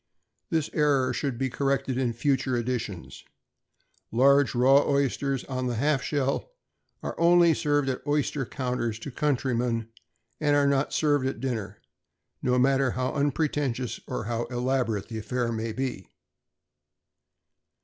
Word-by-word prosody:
This 160 -2 0
error 145 -4 +2
should 135 -4 -2
be 135 +1 0
corrected 135 -1 0
in 125 -2 0
future 130 0 0
editions. 115 -7 -4 0.9
Large 140 +3 +4
raw 135 +3 +6
oysters 140 -1 0
on 130 -1 -3
the 120 - -1
half 140 +3 +1
shell 140 - -1 0.5
are - - -3
only 170 0 +6
served 145 -2 +1
at 130 -1 -2
oyster 145 -1 0
counters 125 -4 -3
to 125 +5 -7
countrymen, 120 -4 0 0.5
and 145 -2 +2
are 145 -1 +4
not 140 0 +1
served 145 -4 +2
at 135 - -2
a - - -14
dinner, 110 -6 -4 0.6
no 125 0 +1
matter 135 +1 +3
how 130 0 -1
unpretentious 140 -3 -1
or 125 - -3
how 115 +2 -2
elaborate 120 -4 -1
the 110 -2 -5
affair 120 +2 -2
may 110 0 -3
be. 130 -6 -4
130 Hz, 140 wpm, -27 LUFS, 120-140 Hz, 0.9 s, raw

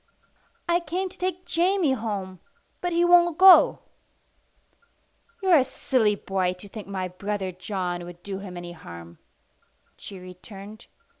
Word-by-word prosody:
"I 345 0 +3
came 355 +3 -3
to - - -14
take 365 0 -3
Jamie 350 -2 +2
home, 200 -6 -4 0.4
but 355 - -1
he 340 +1 +3
won't 345 -2 +5
go." 375 0 +7 1.6
"You're 370 -3 +6
a - - +3
silly 250 -4 +1
boy 190 -2 -1
to 185 +3 -12
think 210 0 -9
my 190 -2 -3
brother 190 +1 -4
John 180 -1 -4
would 175 0 -12
do 195 -1 -5
him 185 -3 -8
any 175 0 -7
harm," 85 - -11 0.8
she 195 - -9
returned. 195 +4 -11
205 Hz, 140 wpm, -25 LUFS, -, 1.6 s, go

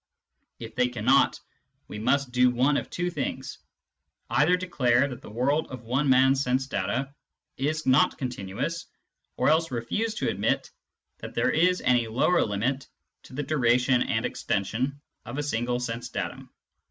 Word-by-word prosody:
If 115 -1 -9
they 125 0 +2
cannot, 125 +2 +2 0.5
we 105 - -7
must 135 +4 +1
do 125 0 +4
one 130 +4 +2
of - - -2
two 175 0 -2
things: - - -4 0.7
either 175 +5 +4
declare 140 -8 +2
that 125 -4 -8
the - - -11
world 135 +8 0
of 125 -2 -9
one 130 +5 0
man's 130 +1 +5
sense 130 +1 0
data 130 +3 -2 0.4
is 155 +3 -1
not 130 +2 +4
continuous, 125 - -4 0.5
or - - +1
else 160 +1 +3
refuse 175 - -2
to - - -1
admit - - -1 0.5
that - - -9
there - - +2
is 180 +3 +2
any 120 -2 +2
lower 135 +10 +2
limit 120 +6 -2 0.4
to - - -14
the 145 +3 -3
duration 125 -3 +2
and - - 0
extension 125 +8 -2 0.2
of 120 +4 -7
a 145 - -1
single 120 -3 -1
sense 120 -1 -4
datum. - - -5
130 Hz, 155 wpm, -26 LUFS, 120-145 Hz, 0.7 s, man's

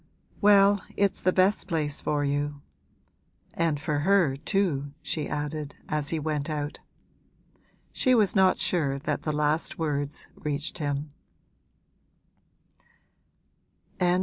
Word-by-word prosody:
'Well, 200 -1 +6 0.2
it's 200 -1 +1
the 185 - +3
best 190 +3 +2
place 155 -5 -2
for 145 -1 0
you. 145 0 -2 0.9
And 165 -3 0
for 150 -1 -1
her 175 -4 +3
too!' 145 -3 -1
she 150 0 -2
added 150 0 -4
as 150 -2 -1
he 165 - 0
went 150 -1 -2
out. 150 -1 -3 1.1
She 255 -2 +3
was 210 -4 +3
not 190 -1 +5
sure 145 -6 +1
that 140 - -2
the 155 - -2
last 150 +2 0
words 145 -2 -2
reached 150 +3 -3
him. 145 0 -2
150 Hz, 115 wpm, -27 LUFS, 145-185 Hz, 1.1 s, Well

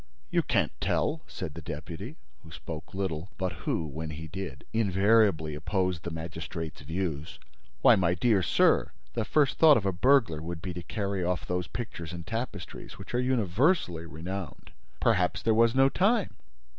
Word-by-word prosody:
"You - - +3
can't - - +1
tell!" - - 0
said 75 - -6
the 85 - -8
deputy, 80 +1 -7 0.3
who 80 - -13
spoke 80 +1 -8
little, 95 -2 -2
but 95 -2 -1
who, 80 - -2
when 80 +2 -5
he 80 +1 -6
did, 85 -6 -7
invariably 100 -6 +3
opposed 90 +3 -1
the 85 - -4
magistrate's 80 0 -6
views. 80 -1 -3 0.5
"Why, 120 - +8
my 90 -3 +2
dear 105 +1 +3
sir, - - +3 0.2
the 115 - 0
first 145 +2 +2
thought 155 -3 +8
of 105 - -2
a 95 - +2
burglar 110 - +3
would 85 +1 -5
be 90 +2 -5
to 90 - -5
carry 100 +1 -2
off 90 0 -1
those 90 -1 -2
pictures 85 -8 -6
and 85 -1 -7
tapestries, 115 -4 -5
which - - -10
are 120 - +2
universally 115 - +1
renowned." 85 +4 -6 0.3
"Perhaps - - +2
there 115 - +3
was 115 +1 +4
no 135 0 +6
time." 200 - +2
90 Hz, 170 wpm, -29 LUFS, 80-110 Hz, 0.5 s, Why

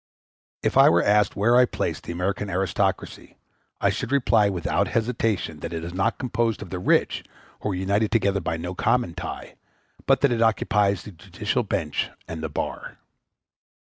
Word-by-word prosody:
If - - +1
I - - +8
were 85 +1 +3
asked 105 0 +3
where 115 +4 +3
I 125 0 +7
place - - -3
the - - -8
American 95 +4 -2
aristocracy, 95 -1 -2 0.4
I - - +2
should - - -4
reply 115 -6 +3
without 90 -4 0
hesitation 110 -8 -1
that 85 - -6
it 80 0 -4
is 85 +1 -6
not 95 +1 0
composed 120 -4 -1
of 95 - -12
the 90 - -3
rich, - - +1 0.4
who - - -3
are 95 - -1
united 100 +3 +1
together 100 -4 +2
by 80 -3 -2
no 90 +3 -5
common 120 0 +1
tie, 90 -1 -7 0.5
but 135 -1 +4
that 140 -2 +4
it 115 -1 0
occupies 105 -3 +2
the 105 - -9
judicial 100 +6 -3
bench 95 -8 -2 0.2
and 80 -1 -6
the 80 - -3
bar. - - -5
100 Hz, 180 wpm, -24 LUFS, 90-115 Hz, 0.5 s, I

